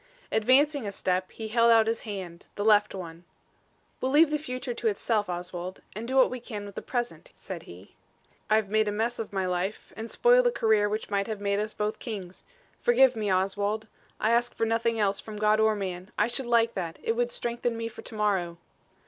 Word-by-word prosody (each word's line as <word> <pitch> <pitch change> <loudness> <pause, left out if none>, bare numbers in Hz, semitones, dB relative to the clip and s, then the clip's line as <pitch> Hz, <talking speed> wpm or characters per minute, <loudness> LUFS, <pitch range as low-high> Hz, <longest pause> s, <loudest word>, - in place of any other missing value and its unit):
Advancing 260 +3 +3
a - - -3
step, 185 -1 -1
he 220 -1 -7
held 230 +1 +4
out 225 -1 +6
his 225 +1 0
hand 190 -6 -7
the 205 - -2
left 210 -2 +4
one. 170 -2 -8 0.8
"We'll 260 - 0
leave 300 +2 +6
the 300 - +1
future 255 -3 -4
to 235 -1 -2
itself, 210 -1 0
Oswald, 180 +1 -5
and 225 +2 -5
do 260 - -2
what 265 - +5
we 255 - -4
can 215 -4 -7
with 200 - -9
the - - -5
present," 245 - -4
said - - -7
he. - - -13 0.6
"I've 215 -1 +3
made 215 +1 +2
a - - +1
mess 225 +3 -1
of 225 - -4
my 190 -2 -1
life 180 +3 -3
and 225 +1 -6
spoiled - - +5
a - - +3
career 220 - +2
which 215 0 -4
might 200 -1 0
have 215 -2 -4
made 200 0 0
us 215 +1 -3
both 210 0 -2
kings. 195 -6 -7 0.3
Forgive 250 +1 +5
me, 210 -3 -1
Oswald. 200 +3 0 0.3
I 220 - +2
ask 240 +1 +1
for 225 - 0
nothing 230 0 0
else 200 -1 +1
from 215 +1 -8
God 215 +1 +3
or 220 0 +4
man. 185 -2 -5
I 210 - +4
should 240 +2 -2
like 230 -1 +3
that. 170 -2 -4
It - - +1
would 240 +1 0
strengthen 235 0 -2
me 230 0 -3
for 230 - -9
to 225 - -9
morrow." 190 -5 0
215 Hz, 215 wpm, -28 LUFS, 200-235 Hz, 0.8 s, out